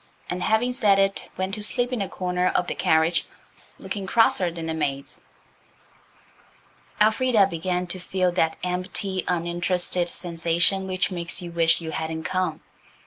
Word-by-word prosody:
And, 180 0 -3
having 220 +6 +1
said 210 -6 +3
it, 195 0 +1
went 190 +1 -2
to 210 - -3
sleep 245 +4 +1
in 240 - -1
a 195 - -2
corner 180 0 -1
of 180 - +1
the - - -3
carriage 160 +2 +2 0.5
looking 200 -3 -5
crosser 190 -4 +3
than 165 -1 -6
the 160 - -2
maids. 140 -3 -3 1.8
Elfrida 220 0 +4
began 180 0 -2
to 180 +1 -5
feel 185 0 0
that 160 -2 +1
empty, 185 +1 -2
uninterested 175 0 0
sensation 170 +3 +1
which 185 +1 -1
makes 175 0 -3
you 175 - -7
wish 165 0 +2
you 160 -1 -5
hadn't 160 0 -4
come. 185 +1 -2
180 Hz, 150 wpm, -24 LUFS, 170-195 Hz, 1.8 s, Elfrida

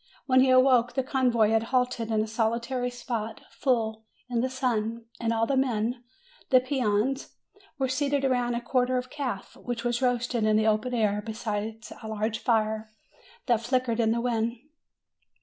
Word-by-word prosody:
When 260 -1 +4
he 260 0 +5
awoke, 255 -2 +5
the 265 - +1
convoy 245 -5 +2
had 225 0 +3
halted 250 -3 0
in 215 -1 +2
a - - -5
solitary 235 +3 -1
spot, 235 -3 -5
full 220 -5 0 0.3
in 235 -1 +1
the 260 - 0
sun, 235 -3 -1
and 230 -1 0
all 225 0 +2
the 275 - 0
men 245 -2 0 0.5
the 255 - +7
peones 255 0 0 0.4
were 265 -1 0
seated 280 +1 0
round 245 -2 +1
a 235 - -2
quarter 255 +1 +1
of 250 0 -4
calf, 260 -9 -4
which 240 -2 -4
was 240 0 0
roasting 245 -2 +1
in 215 - +3
the 220 - +2
open 220 +3 +1
air 210 -2 +1
beside 220 +1 -4 0.2
a 220 - -7
large 220 +1 -2
fire, 220 -1 0 0.6
that 235 -4 +2
flickered 245 -1 0
in 225 -1 +3
the 235 +1 0
wind. 235 -1 0
235 Hz, 170 wpm, -27 LUFS, 220-255 Hz, 0.6 s, the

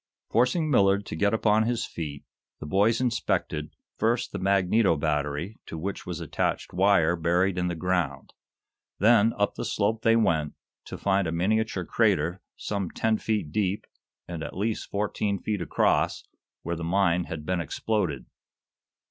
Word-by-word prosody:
Forcing 140 +7 +2
Millard 100 -4 +3
to - - -5
get 100 +5 +2
upon 110 -1 +3
his 120 -1 0
feet, 75 -4 -6 0.4
the - - -7
boys 100 +8 +2
inspected, 95 -10 -1 0.2
first 115 +2 +1
the - - -4
magneto 95 -1 +3
battery, 75 +5 -2
to 80 - -6
which 95 +5 -5
was - - -4
attached - - -2
wire 90 -3 +4
buried 90 +3 +1
in 90 -1 0
the 85 - -2
ground. 80 -5 -2 0.6
Then 115 +1 +5
up 100 0 +1
the - - -5
slope 110 0 0
they 115 0 +4
went, 80 -9 +1 0.3
to - - -7
find 100 -2 +1
a - - -2
miniature 100 +2 0
crater, 95 -6 +1 0.2
some 100 -4 -3
ten 110 -1 0
feet 105 -9 -1
deep 100 +1 -1 0.4
and 85 -2 -6
at 80 - -6
least 110 +3 -2
fourteen 100 0 -1
feet 105 0 -3
across, 85 - +1 0.4
where 85 - -2
the 85 - -6
mine 90 0 +2
had 75 -2 -6
been 90 0 0
exploded. 85 - -2
95 Hz, 155 wpm, -27 LUFS, 85-110 Hz, 0.6 s, Then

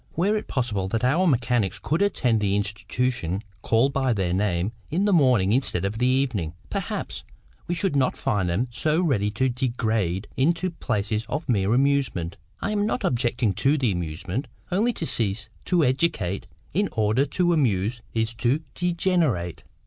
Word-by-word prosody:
Were 195 +6 +2
it 215 - -3
possible 105 -7 -1
that 115 +4 -2
our 160 +9 +3
mechanics 120 - +1
could 160 +4 -1
attend 125 - +2
the 100 -1 +1
institutions 105 -1 -1 0.2
called 120 +5 +2
by 135 -3 +1
their 95 -4 -1
name 95 0 0 0.2
in 180 +6 +1
the 205 - +3
morning 125 - +4
instead 115 -8 +1
of 105 +3 -3
the 125 - +3
evening, 125 - 0 0.2
perhaps - - -4 0.4
we 175 - -1
should 180 -2 0
not 135 -2 +2
find 100 -9 0
them 100 +9 0
so 155 +6 +1
ready 125 - +1
to 110 +5 0
degenerate 115 -7 -1
into 170 +6 +1
places 110 -8 -2
of 150 +3 -3
mere 105 -2 +2
amusement. 130 -11 +1 0.2
I 205 - -1
am 205 0 +1
not 245 - -1
objecting 120 -3 +1
to 140 +10 +2
the 125 -6 +1
amusement; 90 - -3 0.2
only 215 +7 +2
to 165 - -4
cease 105 -4 +1 0.2
to 175 -3 +3
educate 125 - 0 0.3
in 200 +5 +1
order 110 +4 +2
to 175 +4 +1
amuse 120 - +1
is 115 0 -1
to 125 +7 0
degenerate. 170 - 0
120 Hz, 165 wpm, -25 LUFS, 100-150 Hz, 0.4 s, morning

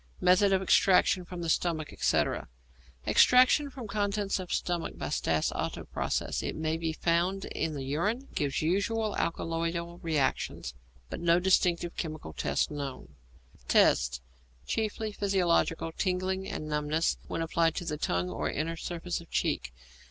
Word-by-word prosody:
Method 195 +2 +4
of 190 0 +2
Extraction 185 -1 +4
from 175 0 -6
the - - -3
Stomach, 160 -3 -3
etc. - - 0 0.6
Extraction 255 +3 +5
from 255 -4 -8
contents 205 -1 -1
of 185 -1 -6
stomach 175 -2 -2
by - - -4
Stas 80 -1 0
Otto - - -3
process. - - -2
It - - -3
may 160 0 -1
be 165 0 -2
found 175 +4 0
in 155 -1 -3
the 135 - -4
urine; 205 - -1
gives 145 0 -1
usual 210 +6 0
alkaloidal 170 +1 -2
reactions, 145 - -1 0.4
but - - -4
no 170 0 +4
distinctive 175 -2 +2
chemical 155 - -5
test - - 0
known. 140 - -5 0.6
Tests. 60 0 +3 0.4
Chiefly 220 0 -2
physiological; 180 -5 +1
tingling 190 +2 -1
and 155 - -5
numbness 150 +2 0
when 165 - -2
applied 165 0 +1
to 165 -3 -3
tongue 90 -10 0
or - - -2
inner 165 +3 -2
surface 175 0 -4
of 170 - -16
cheek. - - -1
170 Hz, 145 wpm, -29 LUFS, 155-190 Hz, 0.6 s, Extraction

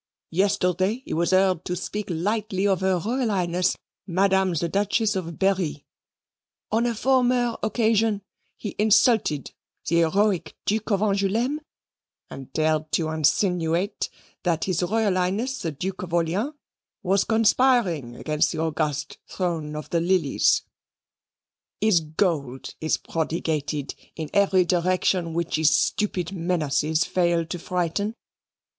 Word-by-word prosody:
Yesterday 190 +4 +1
he - - -5
was 170 +2 +1
heard 185 -2 +3
to 180 - -2
speak 205 +3 -4
lightly 200 +3 -1
of 195 -2 +2
Her 190 -1 +2
Royal 235 +6 -1
Highness 180 -2 0 0.3
Madame 190 0 +2
the 170 +2 0
Duchess 205 +3 +1
of 170 -4 -4
Berri; 185 -7 0 0.9
on 230 +3 +2
a 235 - -1
former 245 -1 +2
occasion 220 -2 +1 0.3
he 210 - -6
insulted 210 - +3 0.4
the 170 - +2
heroic 190 +3 +1
Duke 215 +2 -1
of 200 -2 +1
Angouleme 215 +8 +1 0.7
and 135 0 -9
dared 155 0 0
to 160 -2 +1
insinuate 170 +4 +1 0.3
that 170 -2 0
H.R.H. 195 +5 0
the 165 - -3
Duke 180 +6 -5
of 175 -2 -3
Orleans 185 - 0 0.5
was 195 +1 +2
conspiring 220 - +2
against 150 +3 0
the - - -5
august 150 -2 -2
throne 165 -5 -3
of 150 - -7
the 170 - +2
lilies. 170 -5 +2 1.2
His 215 -5 +4
gold 155 -5 -2
is 160 - +1
prodigated 155 -3 -2 0.2
in 160 -2 -6
every 195 -2 +4
direction 180 -1 +1
which 170 -2 -1
his 155 -1 +4
stupid 185 -4 0
menaces 160 -3 0
fail 170 -2 +1
to 175 +2 -5
frighten. 180 +5 -2
185 Hz, 125 wpm, -24 LUFS, 165-205 Hz, 1.2 s, His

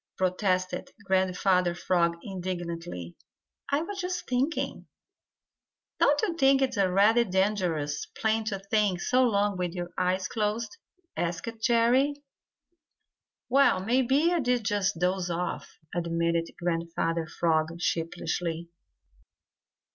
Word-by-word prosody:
protested 185 -1 0 0.2
Grandfather 185 -1 +2
Frog 170 -1 +1
indignantly. 175 - -5 0.6
"I 285 +3 +1
was 395 +2 -5
just 360 0 -3
thinking." 260 +6 -1 1.1
"Don't 290 +1 +4
you 370 -6 0
think 270 -3 +4
it 255 -1 -1
a 195 -3 +2
rather 215 +5 +5
dangerous 180 -7 0
plan 220 0 -1
to 210 -3 -2
think 195 -1 0
so 255 +7 +2
long 205 -4 +1
with 180 -2 -2
your 175 -1 -5
eyes 185 +1 +1
closed?" 220 +6 -2 0.4
asked 175 +7 -3
Jerry. 245 +5 +3 1.3
"Well, 275 -6 +4
maybe 265 - +3
I 345 - +2
did 250 -4 +1
just 200 -2 0
doze 180 +1 0
off," 175 +1 -4 0.2
admitted 170 -1 0
Grandfather 165 -1 -1
Frog 165 0 0
sheepishly. 165 0 -2
190 Hz, 110 wpm, -28 LUFS, 175-235 Hz, 1.3 s, rather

